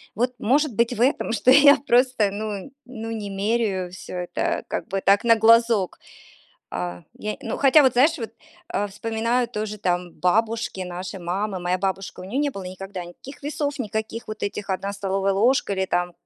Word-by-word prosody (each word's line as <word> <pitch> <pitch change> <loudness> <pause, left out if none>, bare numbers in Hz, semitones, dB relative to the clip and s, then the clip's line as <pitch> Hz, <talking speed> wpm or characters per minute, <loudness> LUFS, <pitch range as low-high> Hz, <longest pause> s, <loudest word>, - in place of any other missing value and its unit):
Вот, 245 +4 0
может 275 +5 +2
быть, 235 +2 +2
в 230 - -4
этом, 255 -1 +2
что 240 +2 +3
я 285 +1 +8
просто, 245 -4 +3
ну 210 +3 -5
ну 225 -3 -7
не 215 -3 -4
меряю 195 -2 -1
всё 185 - -9
это, 180 0 -2
как - - -4
бы 195 0 -2
так, 200 +1 +4
на 230 -1 +6
глазок. 225 -3 +4 0.7
А, 90 -1 -4 0.2
я, 210 0 -3
ну, - - -4
хотя 280 +2 +6
вот 260 -2 +4
знаешь, 295 +7 +4 0.5
а, 205 - -1
вспоминаю 230 +4 -1
тоже 215 -2 -4
там 180 -3 -1
бабушки 220 +4 0
нашей 180 +2 -6
мамы, 190 +3 -2
моя 180 +1 0
бабушка, 190 0 -3
у - - -8
неё 210 +9 -3
не 290 0 +1
было 200 -8 -7
никогда 185 0 -7
никаких 260 +12 -12
весов, 290 -1 -2
никаких 220 0 -4
вот 215 0 -7
этих 205 0 -4
"1 195 +1 -3
столовая 195 0 0
ложка" 225 +2 +2
или 190 -1 0
там, 175 -1 -1
210 Hz, 180 wpm, -23 LUFS, 190-235 Hz, 0.7 s, я